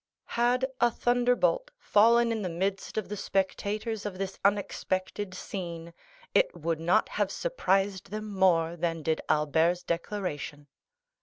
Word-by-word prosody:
Had 245 +2 +2
a 240 - +5
thunderbolt 245 - +2
fallen 230 - +4
in 225 -1 -1
the 185 - -2
midst 190 +5 -2
of 215 - -1
the 210 - -4
spectators 205 +3 -2
of 205 -3 -5
this 195 0 -4
unexpected 195 -1 -1
scene, 170 -3 -6 0.4
it - - +3
would 165 -1 -1
not 165 +2 +3
have - - -1
surprised 195 - 0
them 215 +1 -5
more 180 -5 +2
than 165 -1 -2
did 160 +1 0
Albert's 160 +4 +2
declaration. 170 -5 -4
195 Hz, 135 wpm, -29 LUFS, 170-220 Hz, 0.4 s, a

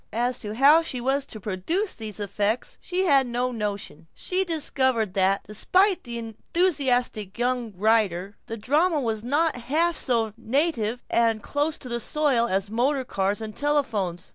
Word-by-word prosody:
As 245 +2 0
to 210 -1 -6
how 285 +6 +6
she 270 -6 -4
was 270 +3 0
to 215 - -8
produce 215 - -1
these 215 -2 -6
effects 205 +3 -2
she 370 +1 -1
had 275 -6 +4
no 245 +1 -1
notion. 205 -8 -5
She 370 +1 -1
discovered 260 - 0
that, 195 +1 +2
despite 370 - +2
the 235 -1 -5
enthusiastic 245 - 0
young 245 -1 -1
writers, 200 -3 +1
the 225 - -5
drama 300 - +2
was 225 -4 -2
not 300 +6 +1
half 315 +8 0
so 230 -6 +1
native 245 -2 -1
and 225 -2 +2
close 295 +2 -1
to 255 - -9
the 235 -1 -2
soil 265 -2 +1
as 195 0 -1
motor 260 +4 +1
cars 200 0 -1
and 215 -1 -6
telephones. 225 - -1
240 Hz, 160 wpm, -25 LUFS, 215-290 Hz, -, how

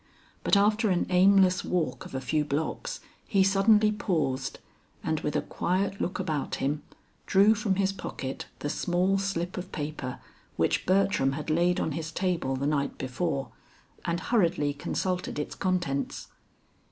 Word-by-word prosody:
But - - +4
after 210 +2 +3
an 180 -2 +2
aimless 185 0 +5
walk 160 -8 -1
of - - -10
a 130 - -2
few 150 +3 +1
blocks, 155 - -3 0.3
he 195 -2 +4
suddenly 210 +2 +4
paused, 145 -10 -1 0.5
and - - 0
with - - -3
a - - +1
quiet 195 +2 -1
look 180 - -1
about 155 -6 -2
him, 145 +2 -1 0.5
drew 205 +2 +6
from 205 -2 0
his 195 0 +1
pocket 135 -7 -5
the 145 - -2
small 180 +2 +1
slip 185 -2 -2
of 185 +1 -6
paper 145 -4 -4 0.4
which - - +1
Bertram 185 -8 +3
had 150 +2 -3
laid 175 +2 +2
on - - -1
his 160 +2 -4
table 175 -7 -1
the 135 +2 -2
night 140 -1 0
before, 135 0 -2 0.5
and 170 0 -1
hurriedly 170 -10 +2
consulted 180 +5 -2
its 150 - -3
contents. 175 -7 -2
175 Hz, 155 wpm, -28 LUFS, 145-195 Hz, 0.5 s, drew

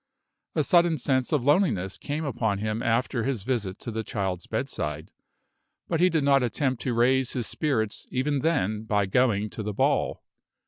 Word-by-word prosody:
A - - +2
sudden 170 -3 +4
sense 130 -1 0
of 145 -5 +1
loneliness 140 - +2
came 150 +2 -4
upon 115 -6 -1
him 110 +2 -2
after 120 0 0
his 130 -6 -2
visit 105 -6 -2
to 120 - -5
the 110 0 -3
child's 95 -5 -3
bedside; 75 0 -3 0.8
but 165 - 0
he 180 +1 +5
did 160 -4 +1
not 140 -1 +4
attempt 130 +1 -1
to 125 -3 -1
raise 130 +2 +3
his 120 -3 -2
spirits 110 -6 -1
even 140 +3 0
then 110 - 0
by 105 -2 +1
going 105 0 +2
to - - -5
the 105 0 -3
ball. - - 0
120 Hz, 175 wpm, -26 LUFS, 105-140 Hz, 0.8 s, he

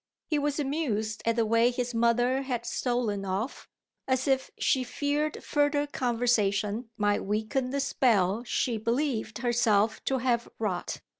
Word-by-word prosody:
He 300 - 0
was 290 +1 -1
amused 225 -8 -1
at 230 - +3
the 230 -1 +2
way 230 +2 +4
his 245 0 -3
mother 240 +3 +2
had 245 -3 -3
stolen 235 -5 -1
off 195 +7 -4 0.4
as 260 0 +1
if 265 -1 +1
she 260 - +2
feared 290 +4 -2
further 290 0 +1
conversation 230 -4 0
might 205 -1 +1
weaken 220 +6 -1
the 280 +2 -1
spell 230 -6 +2
she 240 -2 -1
believed 230 -1 -1
herself 225 -3 +2
to 265 - +1
have 240 -2 0
wrought. 195 -5 -3
240 Hz, 145 wpm, -28 LUFS, 220-265 Hz, 0.4 s, way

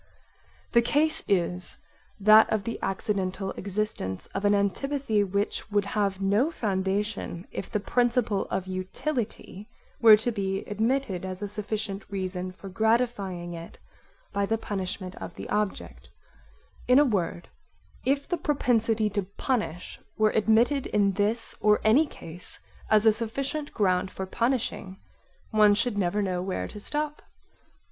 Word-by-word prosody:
The 235 - +5
case 310 +6 +2
is 180 -1 +1 0.4
that 215 +2 +7
of 215 -2 0
the 230 +3 -4
accidental 195 -1 -2
existence 195 - -3
of 195 +1 -2
an 205 0 +5
antipathy 220 +3 0
which 200 +3 -2
[would 205 -1 +1
have] 200 -2 -1
no 205 +9 +2
foundation 200 - -2
[if] 195 - -5
the 210 - -1
principle 235 -2 +1
of 185 - -2
utility 200 +2 -4 0.3
were 220 -2 +9
to 230 +3 -1
be 195 -3 -2
admitted 220 -2 -1
as 185 +1 -5
a - - -2
sufficient 210 -1 -4
reason 185 -2 -3
for 190 +2 -11
gratifying 200 -4 0
it 165 0 -9 0.6
by 200 0 0
the 225 - +1
punishment 190 -3 -4
of - - -8
the - - -7
object; 210 -1 -3 0.8
in 250 - +6
a 295 - +7
word, 180 -7 -1 0.6
if 275 +1 0
the 350 - -1
propensity 230 -7 +1
to 205 +1 0 0.2
punish 210 - -2 0.2
were 215 -1 +4
admitted 230 +6 +3
in 200 -1 +2
this 210 +4 -1
or 210 0 +4
any 260 +9 +5
case 175 - -8 0.3
as 215 0 +4
a 220 - +7
sufficient 275 +7 -3
ground 185 -3 +1
for 190 - -5
punishing, 230 -3 -1 0.5
one 210 -2 +5
should 235 +1 0
never 205 +1 0
know 180 -2 -1
where 185 0 -3
to 210 - -9
stop. 300 +6 -2
210 Hz, 140 wpm, -27 LUFS, 190-230 Hz, 0.8 s, were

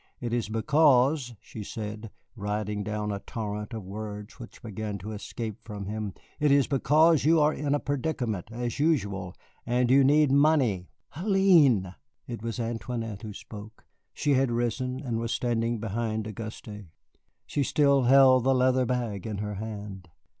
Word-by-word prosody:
It 120 -1 -4
is 120 -3 -1
because," 130 +2 +3
she 110 - -9
said, 105 +1 -6 0.3
riding 105 0 -3
down 105 0 -3
a 100 - -3
torrent 105 -1 -5
of 110 -3 -6
words 105 +1 -7
which 120 +2 -12
began 105 -1 -5
to 100 +3 -7
escape 110 0 -6
from 105 -3 -7
him, 105 -1 -4 0.2
"it 150 -1 +3
is 140 -1 +5
because 155 +3 +3
you 160 +3 +4
are 150 +1 +3
in 145 0 -1
a - - 0
predicament, 130 - -2
as 120 +3 -4
usual, 100 - 0 0.3
and 125 +1 +1
you 135 +1 +6
need 145 +1 +4
money." 135 - +3 0.3
"Hélène!" 165 - +4 0.3
It 120 -3 -6
was 115 +1 -4
Antoinette 115 -2 -4
who 110 - -7
spoke. 105 +1 -11 0.3
She 145 - 0
had 135 -1 +2
risen, 120 +2 -1
and 120 -5 -2
was 115 0 -3
standing 120 -1 0
behind 110 0 -2
Auguste. 110 -1 -8 0.6
She 145 - -2
still 140 -2 +3
held 130 -1 +6
the 135 +1 +3
leather 130 0 +3
bag 115 -5 -2
in 105 -2 -4
her 105 +1 -3
hand. 100 -3 -7
115 Hz, 160 wpm, -27 LUFS, 105-135 Hz, 0.6 s, you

